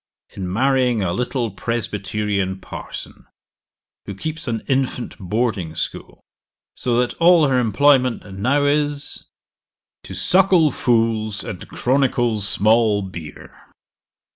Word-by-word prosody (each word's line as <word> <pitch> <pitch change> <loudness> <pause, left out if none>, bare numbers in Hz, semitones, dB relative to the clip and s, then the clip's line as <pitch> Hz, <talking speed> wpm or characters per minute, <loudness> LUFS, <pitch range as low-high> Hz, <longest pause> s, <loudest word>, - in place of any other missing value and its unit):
In 90 -2 -5
marrying 125 0 +2
a 85 -2 -1
little 125 -1 -2
Presbyterian 105 -3 -2
parson, - - -9 0.8
who 100 - -5
keeps 160 - -5
an 115 -2 -2
infant 130 -2 -1
boarding 100 -4 -2
school, - - -5 0.5
so 120 -2 0
that 125 0 +1
all 170 -2 +6
her 130 -2 +2
employment 125 +2 +3
now 140 +7 +2
is, 145 0 -1 0.8
"To 95 - -8
suckle 175 - +3
fools, 115 -4 0
and 90 - -7
chronicle 125 -4 +1
small 105 +1 +2
beer." 85 -5 -9
120 Hz, 110 wpm, -21 LUFS, 100-135 Hz, 0.8 s, all